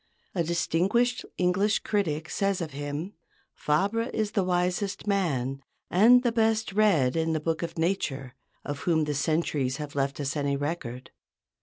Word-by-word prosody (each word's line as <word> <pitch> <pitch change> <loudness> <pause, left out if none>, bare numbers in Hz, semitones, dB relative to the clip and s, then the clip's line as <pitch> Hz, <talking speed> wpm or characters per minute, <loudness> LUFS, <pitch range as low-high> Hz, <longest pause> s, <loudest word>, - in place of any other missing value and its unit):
A 175 - 0
distinguished 185 +9 +1
English 190 +4 +2
critic 165 -6 -1
says 195 -1 0
of 165 -3 -4
him, 145 +7 -5 0.4
"Fabre 200 +10 0
is 215 -2 -1
the 200 -4 +1
wisest 180 +3 -1
man, 140 -10 0 0.3
and 240 +7 +6
the 240 - +2
best 220 -2 +1
read 185 -12 +3
in 160 0 +1
the 155 - 0
book 160 +1 -2
of 170 -1 -5
nature, 145 -7 -1 0.3
of 145 0 -4
whom 160 -1 +1
the 150 -1 -1
centuries 145 -3 0
have 150 -1 -6
left 140 0 -1
us 140 -1 -2
any 140 -1 0
record." 140 -4 -4
170 Hz, 155 wpm, -27 LUFS, 145-200 Hz, 0.4 s, and